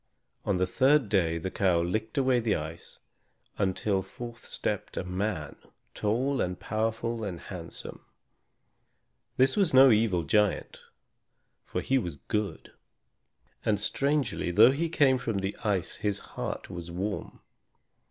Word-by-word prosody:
On 95 - +1
the 90 - +2
third 130 +5 +3
day 85 -5 +2
the 95 +3 -4
cow 95 -5 +2
licked 110 +8 -2
away 130 -2 +3
the 110 -3 +1
ice 80 +1 -7 0.6
until 95 0 +1
forth 120 +5 -9
stepped - - -3
a - - -1
man, 90 -4 -3 0.4
tall 125 +6 0
and 90 0 -2
powerful 115 +1 -2
and 95 -5 -4
handsome. 85 -2 -8 1.3
This 130 +1 +4
was 190 -9 +2
no 130 0 +9
evil 105 -6 +2
giant, 105 +4 +1 0.9
for - - -2
he 135 0 +2
was 85 - -4
good; 105 +8 -3 0.9
and, 105 -2 +1
strangely, 140 -1 0
though 110 +8 +7
he 165 +5 -1
came 135 -5 +4
from 115 -4 -2
the 95 +1 -2
ice 100 -5 0
his 105 -1 -1 0.2
heart - - -4
was 85 -1 -7
warm. 95 +4 -4
105 Hz, 135 wpm, -28 LUFS, 90-120 Hz, 1.3 s, no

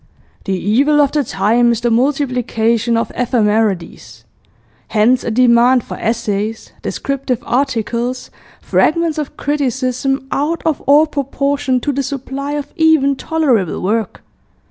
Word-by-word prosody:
'... - - -33
The 195 -2 -1
evil 275 +11 +2
of 285 -2 +3
the 295 -1 +1
time 235 +1 +2
is 235 -1 -1
the 240 0 0
multiplication 240 -3 +1
of 230 - -1
ephemerides. 215 -6 -1 0.6
Hence 235 +4 +2
a - - -2
demand 245 +1 +4
for - - -7
essays, 220 -1 -2
descriptive 275 -3 -3
articles, 245 -1 -2 0.3
fragments 330 -1 +1
of 295 - -6
criticism, 265 -1 -1
out 305 +4 -1
of 315 -3 0
all 290 +3 +6
proportion 280 -2 -1
to 290 - -1
the 280 0 -1
supply 275 +1 -5
of 295 -1 -5
even 315 -4 +3
tolerable 265 - 0
work. 215 +4 -2
255 Hz, 130 wpm, -16 LUFS, 230-285 Hz, 0.6 s, all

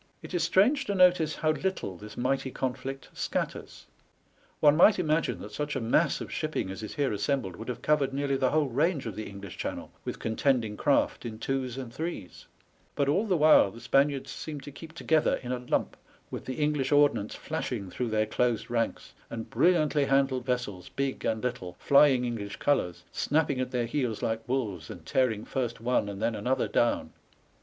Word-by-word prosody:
It - - -9
is 175 - +1
strange 220 - +3
to 200 - -1
notice 180 -4 +4
how 155 0 +1
little 155 - -2
this 105 +4 -11
mighty 135 +2 0
conflict 135 +1 -4
scatters. - - -4 0.7
One 150 -1 +6
might 200 +6 +6
imagine 160 -2 0
that 105 - -8
such 145 +7 -3
a - - 0
mass 115 -1 +2
of - - -6
shipping 95 - -2
as 95 - -7
is 110 - -7
here 140 -6 0
assembled 100 -2 -1
would 110 +5 -9
have 125 - -5
covered 150 -3 +2
nearly 140 0 0
the 130 -1 +2
whole 155 +1 +2
range 145 +4 0
of 110 -4 -5
the 110 - -5
English 100 -1 -9
Channel - - -5
with - - -4
contending 115 -1 0
craft - - +1
in 110 -2 -6
twos 130 +1 -2
and 125 -3 -6
threes; 155 - -6 0.5
but 140 -1 +1
all 195 +9 +2
the 185 -4 +2
while 155 -9 +6
the 115 - -12
Spaniards 135 +1 +1
seemed 150 -3 -6
to 145 - -8
keep 160 +3 -11
together 160 -2 +2
in 125 - -4
a 125 - -1
lump, 125 - -1 0.4
with - - -6
the 130 - -4
English 150 -3 0
ordnance 145 -7 +3
flashing 125 - -4
through 125 -2 -2
their 110 0 +1
closed 115 +1 0
ranks, 115 -1 -2 0.2
and 115 -1 -6
brilliantly 155 -4 +3
handled 135 -2 +1
vessels, 115 -8 -2
big 135 -1 -3
and 110 0 -1
little, 120 -8 -3
flying 140 -3 +5
English 110 -4 -4
colours, 90 -12 0
snapping 145 -3 +1
at 130 - -1
their 125 -2 -1
heels 120 -3 -2
like 110 0 -1
wolves, 105 -11 -2
and 85 -3 -9
tearing 110 +2 +1
first 120 -3 -3
one 115 -3 +1
and 100 -1 -6
then 115 +2 0
another 125 +5 0
down. 120 - +1
130 Hz, 190 wpm, -28 LUFS, 115-150 Hz, 0.7 s, One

